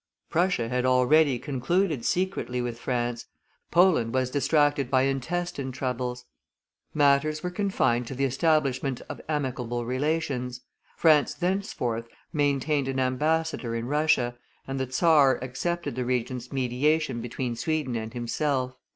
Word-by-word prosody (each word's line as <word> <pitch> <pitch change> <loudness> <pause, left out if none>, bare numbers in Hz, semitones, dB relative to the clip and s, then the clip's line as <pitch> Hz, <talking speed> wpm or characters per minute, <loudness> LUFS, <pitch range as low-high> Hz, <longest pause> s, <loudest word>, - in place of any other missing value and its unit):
Prussia 175 -8 +1
had 125 +1 -1
already 130 +2 +4
concluded 145 +3 -1
secretly 180 -9 -1
with 120 -1 -3
France; 120 -1 -2 0.4
Poland 170 -10 +3
was 130 -1 +1
distracted 145 -2 +2
by 130 -1 +3
intestine 135 +1 -2
struggles; 125 -1 -3 0.7
matters 150 +1 +2
were 180 - -2
confined 130 - 0
to 135 - -6
the 135 +2 +1
establishment 135 -2 +1
of - - -7
amicable 125 -5 -2
relations; 130 -2 -2 0.4
France 155 -3 +4
thenceforth 175 - -2 0.3
maintained 145 -1 +1
an 135 0 -1
ambassador 135 -1 0
in 115 0 -3
Russia, 145 -3 +1 0.3
and 135 0 -3
the 130 -1 -3
czar 145 -3 +5
accepted 170 +7 -3
the 130 - -1
Regent's 125 0 -2
mediation 135 +1 0
between 120 +1 -3
Sweden 150 -1 -1
and 110 -1 -4
himself. 130 +2 -1
135 Hz, 125 wpm, -27 LUFS, 125-155 Hz, 0.7 s, czar